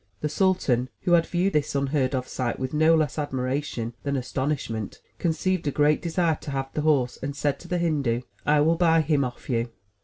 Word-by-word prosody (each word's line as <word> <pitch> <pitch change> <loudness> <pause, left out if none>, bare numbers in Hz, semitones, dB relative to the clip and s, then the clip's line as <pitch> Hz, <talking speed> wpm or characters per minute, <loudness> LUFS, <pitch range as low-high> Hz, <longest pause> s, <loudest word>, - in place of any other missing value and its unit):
The 150 - -1
sultan, 145 -8 +1
who 175 - -1
had 170 -1 +5
viewed 185 +3 0
this 150 -1 0
unheard 140 -1 +1
of 130 0 -2
sight 125 -2 -2
with 130 +1 -4
no 155 +2 +5
less 155 -2 0
admiration 130 -3 -2
than 140 0 -2
astonishment, 130 -4 -3 0.2
conceived 170 0 0
a - - +2
great 150 +1 +3
desire 170 -2 0
to - - -7
have 135 -1 -3
the 150 - -1
horse, 140 -5 +1
and 140 +1 -4
said 145 -1 -1
to 175 - -12
the 180 - -1
Hindu: 145 -9 0 0.2
"I 150 0 +3
will 165 +2 +3
buy 165 -1 +4
him 150 -2 +1
of 125 -1 -6
you." 120 -2 0
145 Hz, 205 wpm, -25 LUFS, 130-160 Hz, 0.2 s, had